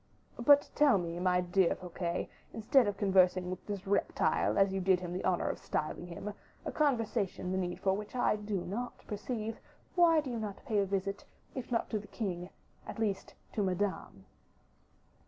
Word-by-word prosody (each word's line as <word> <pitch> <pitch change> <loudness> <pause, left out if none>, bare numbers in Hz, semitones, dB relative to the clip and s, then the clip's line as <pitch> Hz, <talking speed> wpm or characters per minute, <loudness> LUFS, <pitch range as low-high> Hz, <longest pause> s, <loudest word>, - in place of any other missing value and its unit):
But 285 +4 +6
tell 285 -7 +5
me, 170 -1 -3
my 180 0 +3
dear 180 0 +2
Fouquet, 175 -1 -3 0.3
instead 225 +2 +4
of 205 -1 -1
conversing 185 -2 +3
with 185 - -6
this 200 -2 -4
reptile, 200 +1 +1
as 195 -1 +4
you 195 - -1
did 185 0 +4
him 175 -1 -5
the 185 - -3
honor 180 -2 +1
of - - -2
styling 155 +3 -3
him, 195 +4 -6 0.3
a - - -2
conversation 225 - 0
the 190 - 0
need 175 -1 -3
for 190 0 +2
which 210 +4 -5
I 245 - +3
do 205 -3 -3
not 235 +8 -5
perceive, 220 +1 -4 0.3
why 335 -3 +6
do 285 -4 -3
you 235 - -2
not 210 +1 -6
pay 220 -6 +1
a 200 - +1
visit, 195 0 -2 0.3
if 255 -2 -6
not 230 - 0
to 215 - 0
the 205 - -11
king, 180 -5 -4 0.4
at - - -6
least 205 -3 -2 0.2
to 215 - 0
Madame?" 190 - -2
195 Hz, 185 wpm, -32 LUFS, 185-220 Hz, 0.4 s, But